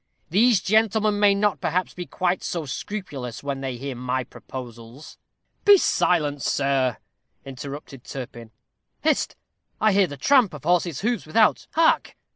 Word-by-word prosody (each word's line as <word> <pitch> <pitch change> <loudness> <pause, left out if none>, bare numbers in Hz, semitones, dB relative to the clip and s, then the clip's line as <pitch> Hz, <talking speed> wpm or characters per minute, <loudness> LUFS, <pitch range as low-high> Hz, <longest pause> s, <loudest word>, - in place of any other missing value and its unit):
"These 220 +3 +4
gentlemen 215 0 +2
may 205 -1 +5
not, 205 0 0
perhaps, 180 +3 -1
be 180 -2 -7
quite 180 +5 -1
so 170 -3 -3
scrupulous, 140 - -6
when 140 -1 -3
they 130 -2 -4
hear 135 +1 -5
my 125 +1 -2
proposals." 120 +2 -10 0.4
"Be 410 -1 +8
silent, 160 - +1
sir," 135 -5 +1 0.5
interrupted 135 0 -8
Turpin. 120 -4 -8 0.5
"Hist! - - +1 0.4
I 215 -2 +3
hear 195 -1 +4
the 145 - -8
tramp 245 - +3
of 145 - -11
horses' 170 -3 +1
hoofs 230 -4 -1
without. 215 +7 +3
Hark! 325 0 +2
155 Hz, 140 wpm, -24 LUFS, 135-205 Hz, 0.5 s, Be